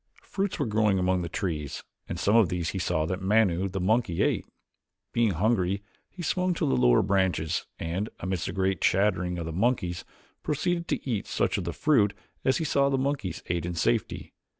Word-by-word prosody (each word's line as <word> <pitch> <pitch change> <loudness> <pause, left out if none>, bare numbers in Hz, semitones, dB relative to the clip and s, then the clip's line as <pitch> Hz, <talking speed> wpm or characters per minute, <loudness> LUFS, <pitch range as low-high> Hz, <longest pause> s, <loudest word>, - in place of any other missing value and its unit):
Fruits 195 -1 -2
were 145 - 0
growing 105 -3 +2
among 90 0 +1
the 85 - -4
trees 80 -5 -3 0.3
and - - -4
some 105 - +2
of 110 -7 +5
these 85 -3 -2
he 95 - -3
saw 85 -3 0
that 90 +3 -3
Manu, 95 -2 +2
the 95 +1 -3
monkey, 95 -2 +1
ate. - - 0 0.7
Being 115 -4 +2
hungry 100 0 +1 0.3
he 180 - -8
swung 180 +2 0
to - - 0
the 65 - +2
lower - - +4
branches 95 -4 0
and, 90 +6 -3
amidst 95 -2 -2
a - - -2
great 95 -1 0
chattering 90 -2 +2
of 85 - -4
the 80 - -5
monkeys, 90 -3 0 0.4
proceeded 170 +3 -1
to - - -2
eat 110 -6 -1
such - - 0
of - - -5
the 85 - -2
fruit 110 - +3 0.3
as 130 - +3
he - - -2
saw 140 -1 +2
the 135 - +1
monkeys 135 -8 -2
ate 85 -2 -1
in 85 0 -3
safety. 85 - -1
95 Hz, 195 wpm, -27 LUFS, 90-115 Hz, 0.7 s, of